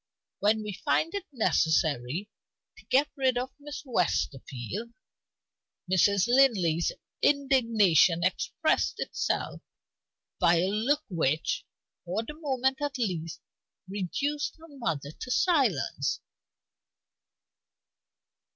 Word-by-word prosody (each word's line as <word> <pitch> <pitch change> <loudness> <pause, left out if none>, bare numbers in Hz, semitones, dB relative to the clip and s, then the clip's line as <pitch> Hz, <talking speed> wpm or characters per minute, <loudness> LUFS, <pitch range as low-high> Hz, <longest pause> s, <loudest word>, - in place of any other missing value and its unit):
When 215 +1 +2
we 210 -1 -5
find 330 - +1
it 400 -2 -3
necessary 160 - +1 0.5
to - - -16
get 280 +3 +3
rid 260 -2 +1
of 255 +2 -2
Miss 295 0 -8
Westerfield 180 - -2 0.5
" 180 - -20
Mrs. 195 +1 +4
Linley's 210 -11 +3 0.3
indignation 230 - +4
expressed 185 - 0
itself - - -2 0.8
by 170 - +5
a 175 +3 +2
look 265 +9 +1
which, 160 -4 -1 0.4
for 185 +6 -2
the 265 - -8
moment 265 -3 -1
at 290 -2 -2
least, 175 -9 -3 0.5
reduced 275 - -2
her 325 - -14
mother 165 - -3
to 250 - -9
silence. 255 - +1
220 Hz, 100 wpm, -28 LUFS, 170-270 Hz, 0.8 s, by